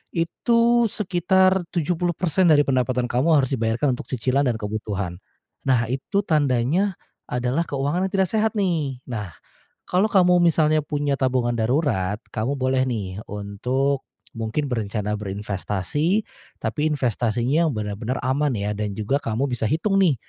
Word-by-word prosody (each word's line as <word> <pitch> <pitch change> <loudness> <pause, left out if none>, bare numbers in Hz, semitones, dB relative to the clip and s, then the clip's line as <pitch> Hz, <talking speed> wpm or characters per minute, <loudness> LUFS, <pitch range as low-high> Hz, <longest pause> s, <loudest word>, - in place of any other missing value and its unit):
itu 235 +7 +2
sekitar 190 -1 +2 0.2
70% 175 +1 +1
dari 150 -3 +6
pendapatan 130 -2 +1
kamu 145 +7 +3
harus 135 -3 +2
dibayarkan 120 +2 +1
untuk - - -8
cicilan 130 +2 0
dan 120 - +1
kebutuhan. 105 -4 -4 0.5
Nah, 120 -3 +2
itu 140 +10 -1
tandanya 150 +4 +1 0.3
adalah 125 +7 -1
keuangan 145 +7 0
yang - - -12
tidak 190 -2 +2
sehat 220 0 +1
nih. 155 -10 -1
Nah, 105 -9 -6 0.5
kalau 185 +4 +1
kamu 180 -4 +4
misalnya 160 -3 +3
punya 145 -2 -1
tabungan 125 -2 +1
darurat, 110 - 0
kamu 115 +6 -1
boleh 130 -1 +1
nih 100 -6 -3
untuk 125 +7 -2 0.2
mungkin 115 +6 -3
berencana 105 -2 -2
berinvestasi, 105 - -1 0.4
tapi 150 0 -1
investasinya 125 +1 +1
yang 150 - -1
benar-benar 110 +4 -3
aman 135 +1 +1
ya, 105 -1 -2
dan 105 -1 -2
juga 110 +7 0
kamu 130 +2 -2
bisa 120 -2 -1
hitung 195 - +1
nih 180 -7 +4
135 Hz, 140 wpm, -23 LUFS, 115-165 Hz, 0.5 s, dari